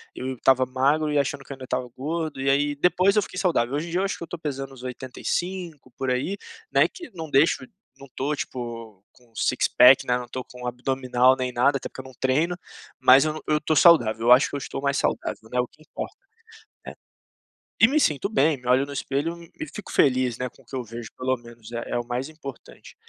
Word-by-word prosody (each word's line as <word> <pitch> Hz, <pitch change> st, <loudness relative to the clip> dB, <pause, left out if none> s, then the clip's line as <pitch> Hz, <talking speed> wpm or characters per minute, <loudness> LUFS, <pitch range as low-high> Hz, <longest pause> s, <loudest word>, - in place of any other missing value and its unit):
eu 130 Hz, +1 st, -4 dB
estava 130 Hz, +1 st, +3 dB
magro 140 Hz, +4 st, +1 dB
e 150 Hz, -, +1 dB
achando 140 Hz, 0 st, -1 dB
que, 140 Hz, -, -8 dB
ainda, 130 Hz, -1 st, -11 dB
estava 125 Hz, 0 st, -2 dB
gordo. 155 Hz, 0 st, -3 dB
E 135 Hz, -, +1 dB
aí, 145 Hz, +1 st, +2 dB
depois 185 Hz, +6 st, +3 dB
eu 210 Hz, -, +4 dB
fiquei 185 Hz, -, -6 dB
saudável. 140 Hz, -10 st, +1 dB
Hoje 155 Hz, +4 st, -2 dB
em -, -, -7 dB
dia, 175 Hz, -, 0 dB
eu -, -, 0 dB
acho 195 Hz, -, -2 dB
que -, -, -7 dB
eu -, -, -7 dB
tô 175 Hz, -, -6 dB
pesando 135 Hz, -4 st, -5 dB
uns 130 Hz, -2 st, -13 dB
85 145 Hz, +4 st, -4 dB
por 135 Hz, -, -2 dB
aí, 130 Hz, +11 st, -1 dB, 0.3 s
né, -, -, +5 dB
que 345 Hz, -5 st, -11 dB
não 160 Hz, -3 st, -7 dB
deixo 145 Hz, +4 st, +3 dB, 0.3 s
não 140 Hz, -, -12 dB
tô, 145 Hz, +3 st, -1 dB
tipo, 115 Hz, -7 st, -6 dB
com 120 Hz, -2 st, -25 dB
six -, -, +1 dB
pack, 125 Hz, +2 st, +7 dB
né. 125 Hz, 0 st, +2 dB
Não 125 Hz, -1 st, -6 dB
tô 130 Hz, +1 st, -5 dB
com 125 Hz, 0 st, -9 dB
abdominal, 125 Hz, 0 st, +2 dB
nem 130 Hz, -1 st, -2 dB
nada. 130 Hz, +3 st, +3 dB
Até -, -, -6 dB
porque, -, -, -9 dB
eu -, -, -20 dB
não 130 Hz, -, -12 dB
treino. 155 Hz, +7 st, +1 dB, 0.4 s
Mas, 130 Hz, +1 st, +7 dB
eu 155 Hz, -, 0 dB
n 155 Hz, -, -7 dB
eu 150 Hz, 0 st, +2 dB
tô 155 Hz, +1 st, 0 dB
saudável. 120 Hz, -9 st, +5 dB
Eu -, -, +6 dB
acho 125 Hz, +3 st, +7 dB
que -, -, -6 dB
eu -, -, 0 dB
estou 135 Hz, -, -6 dB
mais 140 Hz, 0 st, 0 dB
saudável, 110 Hz, -, -2 dB
né, 125 Hz, -, 0 dB
o 125 Hz, -, +1 dB
que 155 Hz, -, -26 dB
importa, 155 Hz, -, -7 dB, 0.7 s
é. -, -, -7 dB, 0.9 s
E, -, -, +8 dB
me 290 Hz, +5 st, +2 dB
sinto 150 Hz, -, +1 dB
bem. 155 Hz, -7 st, +2 dB
Me 125 Hz, -1 st, -12 dB
olho 130 Hz, +2 st, +4 dB
no 140 Hz, -, -8 dB
espelho 145 Hz, +5 st, -3 dB, 0.2 s
e, 320 Hz, -, -4 dB
fico 210 Hz, -, -9 dB
feliz, 125 Hz, -3 st, +2 dB
né, 125 Hz, 0 st, -3 dB
com 135 Hz, -, -23 dB
o -, -, -36 dB
que 135 Hz, -, -9 dB
eu 130 Hz, -, -2 dB
vejo 115 Hz, 0 st, -8 dB
pelo 130 Hz, 0 st, 0 dB
menos. 120 Hz, -1 st, -14 dB
É 120 Hz, 0 st, -5 dB
é -, -, 0 dB
o 120 Hz, -, -4 dB
mais 125 Hz, +3 st, -3 dB
importante. 140 Hz, -5 st, -11 dB
135 Hz, 240 wpm, -25 LUFS, 125-155 Hz, 0.9 s, E